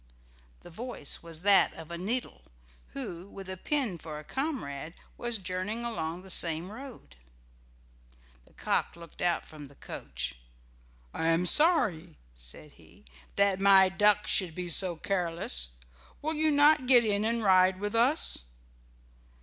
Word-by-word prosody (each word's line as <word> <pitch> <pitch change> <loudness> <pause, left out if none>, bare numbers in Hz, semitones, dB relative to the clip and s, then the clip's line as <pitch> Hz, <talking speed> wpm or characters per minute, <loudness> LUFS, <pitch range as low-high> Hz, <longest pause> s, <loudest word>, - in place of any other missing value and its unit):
The 175 - -13
voice 230 - -5
was 165 0 -7
that 200 -1 +4
of 165 0 -11
a 170 - -5
needle, 225 - -3 0.5
who, 175 +2 -5
with 195 -1 -10
a 190 - -5
pin 230 - -1
for 155 -1 -8
a 150 - -9
comrade, 170 - -5 0.2
was 240 -1 -3
journeying 190 +5 -4
along 175 -6 -4
the 190 - -7
same 170 +2 +3
road. 230 - -11 1.3
The - - -21
cock - - -2
looked 170 -1 -12
out 175 -1 0
from 150 -2 -11
the 140 - -19
coach. 65 - -7 0.7
"I 160 - -2
am 165 +2 +2
sorry," 180 - +3 0.2
said - - -10
he, - - -21 0.3
"that 200 -1 +2
my 195 -1 +6
duck 210 +2 +3
should 175 -5 +1
be 180 -1 -3
so 175 +1 +2
careless. 165 - -1 0.5
Will 315 +1 -1
you 315 0 +1
not 290 -2 +4
get 245 -3 +6
in 205 -1 0
and 230 +1 -1
ride 185 -1 +4
with 205 +1 -3
us?" 235 - +3
185 Hz, 150 wpm, -29 LUFS, 165-230 Hz, 1.3 s, my